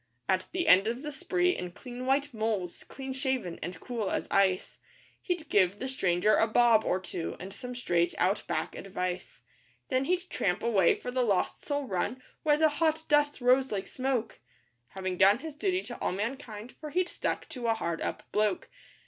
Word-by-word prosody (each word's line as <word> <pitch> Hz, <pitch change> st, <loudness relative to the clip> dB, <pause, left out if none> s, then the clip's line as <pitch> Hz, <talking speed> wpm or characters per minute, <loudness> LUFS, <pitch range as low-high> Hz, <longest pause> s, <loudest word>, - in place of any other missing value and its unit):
At 185 Hz, -1 st, +1 dB
the 350 Hz, -2 st, -1 dB
end 195 Hz, -2 st, +7 dB
of 240 Hz, +4 st, -2 dB
the 300 Hz, -, -4 dB
spree, 360 Hz, +3 st, +1 dB
in 180 Hz, -1 st, -5 dB
clean 250 Hz, +2 st, -7 dB
white 280 Hz, +1 st, +1 dB
'moles,' 215 Hz, -5 st, -2 dB
clean 265 Hz, 0 st, -6 dB
shaven, 260 Hz, -10 st, -2 dB
and 175 Hz, 0 st, -5 dB
cool 230 Hz, -3 st, -3 dB
as -, -, -2 dB
ice, 190 Hz, -2 st, +2 dB, 0.4 s
He'd 350 Hz, -4 st, -2 dB
give 195 Hz, -3 st, +3 dB
the 260 Hz, -, -4 dB
stranger 200 Hz, -5 st, +2 dB
a 225 Hz, -, +4 dB
'bob' 230 Hz, -1 st, +5 dB
or 185 Hz, -, +1 dB
two, 180 Hz, -2 st, -4 dB
and 190 Hz, +1 st, -7 dB
some 250 Hz, +3 st, -7 dB
straight 175 Hz, -8 st, +1 dB
Out 190 Hz, +4 st, +2 dB
Back -, -, -2 dB
advice; 180 Hz, -2 st, -4 dB, 0.5 s
Then 260 Hz, 0 st, +1 dB
he'd 360 Hz, +3 st, 0 dB
tramp 180 Hz, 0 st, 0 dB
away 200 Hz, -7 st, +4 dB
for 250 Hz, -, -6 dB
the 255 Hz, 0 st, +1 dB
Lost 205 Hz, -6 st, 0 dB
Soul 285 Hz, -1 st, 0 dB
Run, 200 Hz, +4 st, -2 dB, 0.2 s
where 295 Hz, -1 st, +3 dB
the 315 Hz, 0 st, +5 dB
hot 315 Hz, +1 st, +1 dB
dust 295 Hz, -2 st, +3 dB
rose 255 Hz, +2 st, +4 dB
like 195 Hz, -2 st, -2 dB
smoke, 255 Hz, -1 st, -2 dB, 0.5 s
Having 185 Hz, -1 st, -4 dB
done 195 Hz, +3 st, +7 dB
his 310 Hz, +4 st, -7 dB
duty 370 Hz, +3 st, 0 dB
to 240 Hz, -, -7 dB
all -, -, -1 dB
mankind, 225 Hz, +1 st, -5 dB
for 305 Hz, -, -6 dB
he'd 360 Hz, +4 st, +1 dB
'stuck -, -, -3 dB
to 250 Hz, -6 st, -4 dB
a 225 Hz, -, +3 dB
hard 170 Hz, -6 st, -3 dB
up -, -, -3 dB
bloke. 210 Hz, -2 st, 0 dB
240 Hz, 190 wpm, -30 LUFS, 190-285 Hz, 0.5 s, end